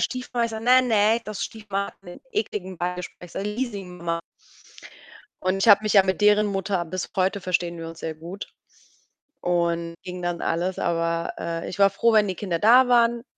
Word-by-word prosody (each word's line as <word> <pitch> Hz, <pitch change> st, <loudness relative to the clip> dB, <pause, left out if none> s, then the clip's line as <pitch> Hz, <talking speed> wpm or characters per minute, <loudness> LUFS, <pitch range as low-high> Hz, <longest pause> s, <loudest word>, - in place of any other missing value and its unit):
Stiefmama. 250 Hz, -2 st, -1 dB
Ich 230 Hz, -, -2 dB
sage: 220 Hz, 0 st, -6 dB
„Ne, 255 Hz, +1 st, +6 dB
ne, 225 Hz, -1 st, +3 dB
das 215 Hz, -1 st, -5 dB
Stiefmama 200 Hz, -3 st, -3 dB
hat -, -, -17 dB
'nen 175 Hz, -, -11 dB
ekligen 195 Hz, -, -3 dB
Beigeschmack“, 180 Hz, 0 st, -4 dB
ich 175 Hz, -, -13 dB
sage 200 Hz, -, -3 dB
„Leasing-Mama.“ 185 Hz, -7 st, -4 dB, 1.2 s
Und 185 Hz, +1 st, +1 dB
ich 195 Hz, +4 st, +1 dB
habe 205 Hz, 0 st, +8 dB
mich 215 Hz, 0 st, 0 dB
ja 195 Hz, -, +8 dB
mit 190 Hz, +1 st, -1 dB
deren 210 Hz, 0 st, +5 dB
Mutter 195 Hz, -2 st, -1 dB
bis 180 Hz, +2 st, -5 dB
heute 195 Hz, +2 st, +1 dB
verstehen 175 Hz, -2 st, -1 dB
wir 165 Hz, -, -6 dB
uns 165 Hz, 0 st, -11 dB
sehr 160 Hz, -, -4 dB
gut. 170 Hz, +5 st, -8 dB, 0.9 s
Und 170 Hz, -1 st, 0 dB
ging 180 Hz, 0 st, -6 dB
dann 175 Hz, -1 st, -2 dB
alles, 180 Hz, +3 st, -1 dB
aber, 165 Hz, 0 st, -1 dB
äh, 165 Hz, 0 st, -4 dB
ich 200 Hz, -, -7 dB
war 200 Hz, -, +6 dB
froh, 230 Hz, +4 st, +2 dB
wenn 215 Hz, -2 st, +4 dB
die 185 Hz, -, -2 dB
Kinder 180 Hz, -2 st, -3 dB
da 245 Hz, +6 st, +6 dB
waren. 235 Hz, -1 st, +3 dB
195 Hz, 195 wpm, -24 LUFS, 175-215 Hz, 1.2 s, habe